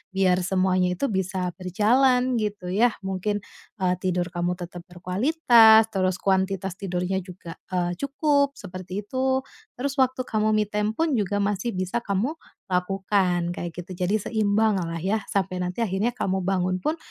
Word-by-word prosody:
biar 185 Hz, -1 st, +3 dB
semuanya 185 Hz, -1 st, +1 dB
itu 275 Hz, -, -1 dB
bisa 185 Hz, -1 st, -1 dB
berjalan 250 Hz, +8 st, +2 dB
gitu 205 Hz, -4 st, -3 dB
ya, 230 Hz, +6 st, +3 dB
mungkin, 195 Hz, +2 st, -2 dB, 0.4 s
eee, 180 Hz, -1 st, +1 dB
tidur 180 Hz, -1 st, 0 dB
kamu 175 Hz, 0 st, -1 dB
tetap 175 Hz, 0 st, -8 dB
berkualitas, 220 Hz, -, +5 dB
terus 185 Hz, -1 st, +1 dB
kuantitas 190 Hz, -1 st, 0 dB
tidurnya 185 Hz, 0 st, -2 dB
juga, 180 Hz, -2 st, -10 dB, 0.2 s
eee, 175 Hz, -1 st, 0 dB
cukup, 280 Hz, 0 st, +1 dB
seperti 185 Hz, 0 st, -6 dB
itu, 260 Hz, +2 st, +1 dB, 0.4 s
terus 275 Hz, +2 st, -2 dB
waktu 260 Hz, -1 st, +2 dB
kamu 215 Hz, 0 st, +1 dB
me 215 Hz, -1 st, +2 dB
time 210 Hz, +1 st, -1 dB
pun 320 Hz, -1 st, +1 dB
juga 205 Hz, -2 st, 0 dB
masih 205 Hz, +3 st, -1 dB
bisa 185 Hz, +5 st, -1 dB
kamu 215 Hz, +9 st, -1 dB, 0.3 s
lakukan, 180 Hz, -2 st, 0 dB
kayak 175 Hz, -2 st, -5 dB
gitu, 180 Hz, +2 st, -7 dB
jadi 200 Hz, +4 st, +1 dB
seimbang 215 Hz, 0 st, +1 dB
lah 165 Hz, -1 st, -4 dB
ya, 195 Hz, +6 st, -1 dB
sampai 185 Hz, -2 st, -1 dB
nanti 180 Hz, +4 st, -3 dB
akhirnya 195 Hz, +3 st, 0 dB
kamu 190 Hz, -5 st, -1 dB
bangun 185 Hz, 0 st, 0 dB
pun 310 Hz, -, -1 dB
195 Hz, 155 wpm, -25 LUFS, 180-220 Hz, 0.4 s, berkualitas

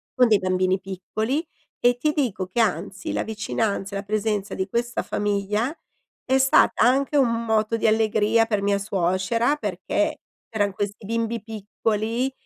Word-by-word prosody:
con 250 Hz, -1 st, +5 dB
dei 215 Hz, -3 st, +4 dB
bambini 185 Hz, 0 st, +1 dB
piccoli, 215 Hz, -, -3 dB, 0.4 s
e 245 Hz, 0 st, +4 dB
ti 300 Hz, +5 st, +1 dB
dico 240 Hz, -, -1 dB
che 190 Hz, +6 st, -3 dB
anzi, 190 Hz, -1 st, -1 dB
la -, -, 0 dB
vicinanza 210 Hz, -2 st, -2 dB
e 200 Hz, -, -1 dB
la -, -, -6 dB
presenza 210 Hz, -1 st, -1 dB
di 190 Hz, +1 st, -2 dB
questa 235 Hz, +3 st, -1 dB
famiglia 210 Hz, +6 st, -1 dB, 0.5 s
è 265 Hz, +1 st, +3 dB
stata 265 Hz, -4 st, +4 dB
anche 270 Hz, +4 st, +2 dB
un 235 Hz, -3 st, +2 dB
moto 220 Hz, 0 st, +1 dB
di 220 Hz, -, +1 dB
allegria 220 Hz, +1 st, +3 dB
per 210 Hz, -3 st, -1 dB
mia 200 Hz, 0 st, +2 dB
suocera, 200 Hz, +6 st, +1 dB
perché 220 Hz, -, -2 dB, 0.3 s
erano 205 Hz, -2 st, +1 dB
questi 205 Hz, +2 st, -4 dB
bimbi 230 Hz, +1 st, -2 dB
piccoli 220 Hz, +3 st, -2 dB
215 Hz, 155 wpm, -24 LUFS, 200-235 Hz, 0.5 s, con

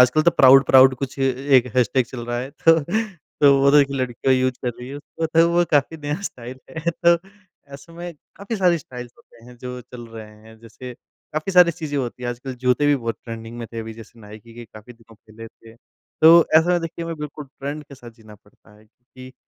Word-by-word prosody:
आजकल 155 Hz, +5 st, 0 dB
तो 170 Hz, -, +4 dB
प्राउड-प्राउड 130 Hz, -1 st, +6 dB
कुछ 135 Hz, +1 st, -7 dB
ए 135 Hz, -1 st, +2 dB, 0.3 s
एक 125 Hz, 0 st, +3 dB
हैशटैग 125 Hz, 0 st, +2 dB
चल 120 Hz, -2 st, -8 dB
रहा 120 Hz, 0 st, -3 dB
है 130 Hz, +2 st, -6 dB
तो 165 Hz, +3 st, +3 dB, 0.6 s
तो 140 Hz, -1 st, +6 dB
वो 140 Hz, 0 st, +4 dB
तो 150 Hz, -, +5 dB
एक 140 Hz, -, 0 dB
लड़की 130 Hz, -1 st, -1 dB
यूज़ 130 Hz, 0 st, 0 dB
कर -, -, 0 dB
रही 125 Hz, +1 st, -9 dB
है 140 Hz, -, -8 dB
उसको 160 Hz, +2 st, -5 dB
तो 165 Hz, +1 st, +3 dB
वो 175 Hz, 0 st, +3 dB
काफ़ी 145 Hz, +2 st, +1 dB
नया 150 Hz, +4 st, -5 dB
स्टाइल 130 Hz, -7 st, -8 dB, 0.2 s
है 170 Hz, +2 st, -1 dB
तो 170 Hz, 0 st, +2 dB, 0.6 s
ऐसे 140 Hz, +4 st, -13 dB
में 175 Hz, +1 st, -8 dB, 0.2 s
काफ़ी 205 Hz, +3 st, -5 dB
सारी 180 Hz, -3 st, +2 dB
स्टाइल्स 125 Hz, -3 st, -10 dB
होते 115 Hz, 0 st, -21 dB
हैं 125 Hz, 0 st, -15 dB
जो 125 Hz, 0 st, -7 dB
चल 125 Hz, -1 st, -12 dB
रहे 115 Hz, -1 st, -10 dB, 0.2 s
हैं। 110 Hz, 0 st, -16 dB
जैसे 120 Hz, +2 st, -11 dB, 0.4 s
काफ़ी 155 Hz, +5 st, -3 dB
सारी 180 Hz, -1 st, +6 dB
चीज़ें 155 Hz, -3 st, -6 dB
होती 125 Hz, -1 st, -5 dB
हैं 120 Hz, -, -3 dB
आजकल 125 Hz, +2 st, -7 dB
जूते 125 Hz, +3 st, +1 dB
भी 145 Hz, -, +4 dB
बहुत 115 Hz, -4 st, -4 dB
ट्रेंडिंग 115 Hz, 0 st, -8 dB
में 115 Hz, -, -6 dB
थे 115 Hz, -, -6 dB
अभी 110 Hz, 0 st, -8 dB
जैसे 115 Hz, +1 st, -15 dB
नाइकी 110 Hz, +2 st, -14 dB
के 120 Hz, 0 st, -10 dB
काफ़ी 110 Hz, +2 st, -14 dB
दिनों 115 Hz, -1 st, -21 dB
पहले 110 Hz, +1 st, -14 dB
थे। 115 Hz, 0 st, -19 dB, 0.5 s
तो 165 Hz, +1 st, +7 dB
ऐसा 175 Hz, +2 st, +3 dB
देखिए 165 Hz, 0 st, -6 dB
मैं 165 Hz, -, -4 dB
बिल्कुल 150 Hz, 0 st, -8 dB
ट्रेंड 140 Hz, +2 st, -7 dB
के 140 Hz, -, -14 dB
साथ 120 Hz, -2 st, -13 dB
जीना 110 Hz, -2 st, -17 dB
पड़ता 105 Hz, +1 st, -24 dB
है 110 Hz, -, -22 dB
क्योंकि 130 Hz, +3 st, -16 dB
130 Hz, 220 wpm, -21 LUFS, 120-150 Hz, 0.6 s, तो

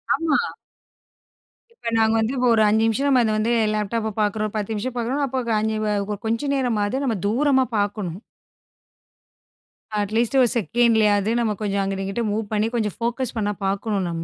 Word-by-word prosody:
ஆமா. 320 Hz, -3 st, +1 dB, 1.4 s
இப்ப, 235 Hz, -, -5 dB
நாங்க 220 Hz, 0 st, +3 dB
வந்து 225 Hz, +4 st, 0 dB
ஒரு 225 Hz, -2 st, +4 dB
5 220 Hz, +1 st, +3 dB
நிமிஷம், 225 Hz, +5 st, +1 dB
நம்ம 260 Hz, -3 st, +4 dB
அதை 220 Hz, -, +1 dB
வந்து 225 Hz, +2 st, +1 dB, 0.2 s
லேப்டாப்பை 215 Hz, +1 st, -1 dB
பார்க்குறோம், 215 Hz, 0 st, -1 dB
10 210 Hz, 0 st, -2 dB
நிமிஷம் 220 Hz, +4 st, -3 dB
பார்க்குறோம்னா, 250 Hz, +4 st, -1 dB
அப்போ, 260 Hz, 0 st, -1 dB
க -, -, +1 dB
5 220 Hz, 0 st, -1 dB
வ -, -, 0 dB, 0.2 s
கொ 210 Hz, -, -1 dB
கொஞ்ச 230 Hz, +6 st, -1 dB
நேரமாவது 245 Hz, -1 st, 0 dB
நம்ம 245 Hz, -5 st, 0 dB
தூரமா 265 Hz, +4 st, +2 dB
பார்க்கணும். 205 Hz, -4 st, -2 dB, 1.8 s
அட்லீஸ்ட் 220 Hz, +5 st, 0 dB
1 250 Hz, -, +5 dB
செகண்ட்லயாவது, 220 Hz, -2 st, +2 dB
நம்ம 230 Hz, -2 st, +1 dB
கொஞ்சம் 200 Hz, -1 st, 0 dB
அங்கிட்டு, 195 Hz, 0 st, -2 dB
இங்கிட்டு 195 Hz, +5 st, -2 dB
மூவ் 215 Hz, +2 st, -1 dB
பண்ணி 215 Hz, +1 st, +1 dB
கொஞ்சம் 215 Hz, -4 st, -1 dB
ஃபோக்கஸ் 240 Hz, +1 st, -2 dB
பண்ண 205 Hz, -1 st, 0 dB
பார்க்கணும், 195 Hz, 0 st, -1 dB
நம்ம. 165 Hz, -1 st, -4 dB
220 Hz, 165 wpm, -22 LUFS, 205-240 Hz, 1.8 s, 1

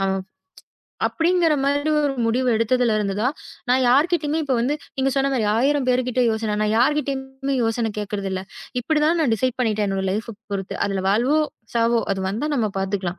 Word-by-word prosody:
அ -, -, +1 dB, 1.0 s
அப்டிங்கிற 340 Hz, -1 st, +2 dB
மாரி 285 Hz, +2 st, +1 dB
ஒரு 285 Hz, -2 st, 0 dB
முடிவு 250 Hz, +3 st, +1 dB
எடுத்ததுல 230 Hz, +1 st, +2 dB
இருந்து 200 Hz, -2 st, -1 dB
தான் 260 Hz, +5 st, +1 dB, 0.4 s
நான் 260 Hz, +1 st, +4 dB
யார்கிட்டயுமே 305 Hz, +3 st, +2 dB
இப்ப 275 Hz, -2 st, 0 dB
வந்து 270 Hz, +5 st, +1 dB, 0.2 s
நீங்க 270 Hz, +1 st, +2 dB
சொன்ன 275 Hz, 0 st, +2 dB
மாரி 235 Hz, -4 st, +1 dB
1000 275 Hz, +2 st, +2 dB
பேருகிட்ட 250 Hz, 0 st, +1 dB
யோசனை, 220 Hz, -1 st, -1 dB
நான் 215 Hz, -, +1 dB
யார்கிட்டயும் 270 Hz, 0 st, 0 dB
யோசனை 225 Hz, 0 st, 0 dB
கேக்குறது 205 Hz, -1 st, -3 dB
இல்ல. 185 Hz, -, -2 dB, 0.4 s
இப்டி 300 Hz, +5 st, 0 dB
தான் 335 Hz, +2 st, +2 dB
நான் 260 Hz, -7 st, +2 dB
டிசைட் 250 Hz, +3 st, -1 dB
பண்ணிட்டேன். 215 Hz, -3 st, +1 dB
என்னோட 195 Hz, 0 st, -1 dB
லைஃப் 220 Hz, +3 st, -3 dB, 0.2 s
பொறுத்து. 195 Hz, -1 st, -3 dB
அதுல 195 Hz, -1 st, -2 dB
வாழ்வோ 245 Hz, +10 st, +3 dB, 0.4 s
சாவோ, 230 Hz, 0 st, +3 dB
அத 195 Hz, -, -3 dB
வந்தா 235 Hz, +10 st, -2 dB
நம்ம 225 Hz, -4 st, +1 dB
பாத்துக்கலாம். 190 Hz, -2 st, -2 dB
250 Hz, 175 wpm, -22 LUFS, 215-280 Hz, 1.0 s, நான்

